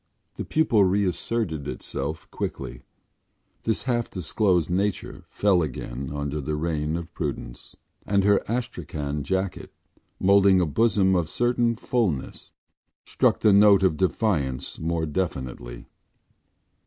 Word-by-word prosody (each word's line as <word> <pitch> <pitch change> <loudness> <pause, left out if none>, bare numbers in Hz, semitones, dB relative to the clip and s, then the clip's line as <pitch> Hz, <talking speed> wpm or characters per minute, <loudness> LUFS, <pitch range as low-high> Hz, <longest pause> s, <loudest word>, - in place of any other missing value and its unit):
The - - -6
pupil 120 -10 +3
reasserted 95 -3 0
itself 75 +3 -4
quickly, - - -5 0.8
this 110 - 0
half 120 -2 -1
disclosed 90 -1 +1
nature 95 +3 -2
fell 100 -4 +2
again 65 -3 -5
under 75 +1 -3
the 75 +2 -2
reign 80 0 -1
of 85 0 -8
prudence, 70 -7 -6 0.3
and 100 -1 +1
her 100 0 +4
astrakhan 80 - -3
jacket, 95 +4 -2 0.5
moulding 100 0 +5
a 90 - +2
bosom 95 +2 +2
of 85 -2 +1
a - - -15
certain 120 +1 +1
fullness, 110 - -2 0.5
struck - - +1
the 105 - +5
note 100 -1 +6
of 90 -4 +3
defiance 75 - -1
more 80 0 -1
definitely. 65 -7 -4
90 Hz, 120 wpm, -25 LUFS, 75-100 Hz, 0.8 s, note